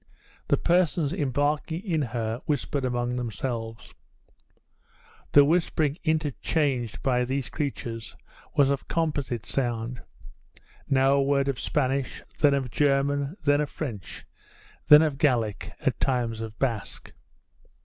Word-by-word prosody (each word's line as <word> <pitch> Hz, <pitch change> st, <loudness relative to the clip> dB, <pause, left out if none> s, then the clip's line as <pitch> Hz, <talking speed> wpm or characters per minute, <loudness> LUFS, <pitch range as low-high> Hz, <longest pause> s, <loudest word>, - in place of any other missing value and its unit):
The -, -, +3 dB
persons 170 Hz, -3 st, +2 dB
embarking 150 Hz, +2 st, -1 dB
in 165 Hz, -6 st, 0 dB
her 115 Hz, -2 st, -3 dB
whispered 145 Hz, -1 st, -1 dB
among 120 Hz, -1 st, -1 dB
themselves. 115 Hz, -1 st, -4 dB, 1.4 s
The 145 Hz, 0 st, +8 dB
whispering 160 Hz, -2 st, +1 dB
interchanged 150 Hz, -5 st, -1 dB
by 125 Hz, -2 st, +2 dB
these 130 Hz, +1 st, -2 dB
creatures 120 Hz, -6 st, -4 dB, 0.4 s
was 140 Hz, -1 st, +4 dB
of 140 Hz, -, -2 dB
composite 145 Hz, -8 st, -1 dB
sound 120 Hz, -2 st, -2 dB, 0.9 s
now 135 Hz, 0 st, +4 dB
a 140 Hz, -, +3 dB
word 140 Hz, 0 st, +2 dB
of 135 Hz, -2 st, -1 dB
Spanish, 135 Hz, -2 st, -1 dB, 0.2 s
then 145 Hz, -2 st, +5 dB
of 130 Hz, -3 st, -2 dB
German, 140 Hz, -, +1 dB
then 145 Hz, 0 st, +3 dB
of 150 Hz, -, -2 dB
French, 115 Hz, -, -6 dB, 0.6 s
then 150 Hz, +1 st, +9 dB
of 145 Hz, -3 st, -1 dB
Gaelic, 120 Hz, -, +1 dB
at -, -, 0 dB
times 120 Hz, -4 st, 0 dB
of 110 Hz, -1 st, -7 dB
Basque. 115 Hz, -6 st, -3 dB
135 Hz, 120 wpm, -26 LUFS, 120-150 Hz, 1.4 s, then